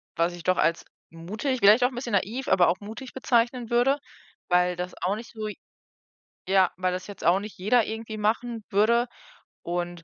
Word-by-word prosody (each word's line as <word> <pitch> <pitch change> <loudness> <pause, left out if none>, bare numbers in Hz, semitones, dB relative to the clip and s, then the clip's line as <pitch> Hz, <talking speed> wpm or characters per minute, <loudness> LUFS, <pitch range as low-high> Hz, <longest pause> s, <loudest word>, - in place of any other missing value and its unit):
was 170 +1 +1
ich 175 - -9
doch 185 +2 +2
als 165 0 +1 0.3
mutig 210 - -3
vielleicht 215 +5 +6
auch 250 - +4
'n 250 - -12
bisschen 240 -3 -5
naiv, 225 +7 -1
aber 185 -2 +4
auch 175 +2 +1
mutig 225 +5 -9
bezeichnen 240 -2 +1
würde, 245 +4 +3 0.5
weil 180 0 +3
das 180 +1 -5
auch 195 +3 0
nicht 230 +2 -9
so 215 -1 -5 1.0
ja, 190 -2 +4
weil 185 0 0
das 180 0 -4
jetzt 205 -2 -10
auch 180 +3 +4
nicht 210 -2 -9
jeder 215 +5 +3
irgendwie 220 0 -6
machen 225 +1 -1
würde. 230 +4 +3 0.6
Und 175 0 -4
210 Hz, 185 wpm, -26 LUFS, 180-235 Hz, 1.0 s, vielleicht